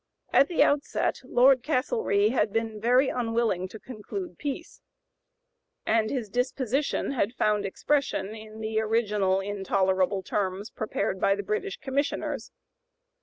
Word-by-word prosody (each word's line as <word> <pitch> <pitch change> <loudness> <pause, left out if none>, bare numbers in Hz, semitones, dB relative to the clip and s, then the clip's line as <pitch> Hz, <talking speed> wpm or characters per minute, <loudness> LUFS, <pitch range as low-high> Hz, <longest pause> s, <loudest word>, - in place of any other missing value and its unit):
At 275 - +6
the 345 - +3
outset 285 0 0
Lord 260 +1 +5
Castlereagh 255 - +1
had 215 -5 +1
been 225 -1 -2
very 250 +4 +4
unwilling 225 -6 0
to 215 +4 -10
conclude 260 - -7
peace, 295 +3 -5 1.0
and 220 -1 +2
his 250 -6 -2
disposition 255 +5 -1
had 240 -3 -1
found 210 -3 +1
expression 260 -2 -1
in 220 0 -10
the 220 0 -1
original 210 -4 +1
intolerable 190 -1 0
terms 195 +2 -2
prepared 205 -3 -2
by 195 - +4
the 205 - -4
British 215 - -2
Commissioners. 280 +1 -2
220 Hz, 125 wpm, -27 LUFS, 205-260 Hz, 1.0 s, At